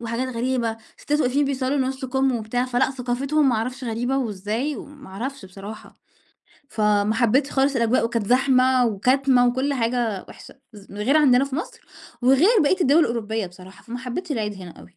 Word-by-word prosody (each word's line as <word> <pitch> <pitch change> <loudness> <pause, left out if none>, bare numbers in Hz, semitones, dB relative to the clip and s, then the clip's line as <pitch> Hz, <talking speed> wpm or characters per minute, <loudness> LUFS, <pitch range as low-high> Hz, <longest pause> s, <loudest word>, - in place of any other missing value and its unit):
وحاجات 235 +2 -3
غريبة. 235 -2 -1 0.2
سِتّات 295 +1 -1
واقفين 280 +1 +1
بيصلّوا 275 0 -1
نُص 265 +1 -5
كُم 265 0 +1
وبتاع، 235 +3 -2
فلأ 250 0 +1
ثقافتهم 270 +3 0
ما 245 - +2
أعرفش 250 +4 -3
غريبة 245 +3 -1
وإزاي 225 +4 -3
وما 285 -1 -11
أعرفش 250 +5 -6
بصراحة. 200 +3 -10 0.7
فما 210 0 +1
حبّتش 255 +4 +2
خالص 275 0 +1
الأجواء، 235 0 +2
وكانت 230 -2 -2
زحمة 255 +1 +3
وكَتمة 250 +4 +2
وكلّ 260 +3 0
حاجة 230 -5 -1
وِحشة، - - -13 0.2
ز 205 -2 -14
غير 210 +9 +1
عندنا 270 -4 +5
في 275 0 -5
مصر، 335 - -6 0.4
وغير 315 - +4
بقيّة 365 +6 +1
الدول 300 0 +4
الأوروبية 225 - -1
بصراحة، 185 +2 -14
فما 245 +1 -7
حبّتش 260 +7 -5
العيد 215 -5 -2
هنا 185 -3 -10
أوي. 180 - -17
250 Hz, 170 wpm, -23 LUFS, 220-270 Hz, 0.7 s, عندنا